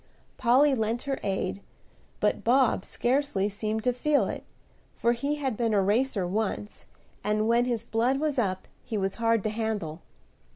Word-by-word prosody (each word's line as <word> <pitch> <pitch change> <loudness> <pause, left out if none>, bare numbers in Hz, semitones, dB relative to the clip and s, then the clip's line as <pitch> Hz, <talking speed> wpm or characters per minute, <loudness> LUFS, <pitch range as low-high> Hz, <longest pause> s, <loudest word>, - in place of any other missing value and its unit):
Polly 260 +4 +4
lent 230 0 -1
her 275 -1 -2
aid; 195 0 -2 0.6
but - - +1
Bob 245 -4 +3
scarcely 250 -6 0
seemed 215 +1 -3
to 250 - +2
feel 290 +4 +2
it, - - -5 0.5
for 235 - +2
he 280 +5 -1
had 270 -5 -2
been 225 -1 +1
a 200 - +4
racer 210 0 +1
once, 205 +2 -3 0.4
and 210 +1 +1
when 235 +1 +3
his 235 -3 -1
blood 235 +4 +1
was 300 -3 0
up 190 -5 -1 0.2
he 225 - -3
was 195 -1 -1
hard 230 -2 +3
to 215 - 0
handle. 215 -8 -3
230 Hz, 165 wpm, -27 LUFS, 210-255 Hz, 0.6 s, Polly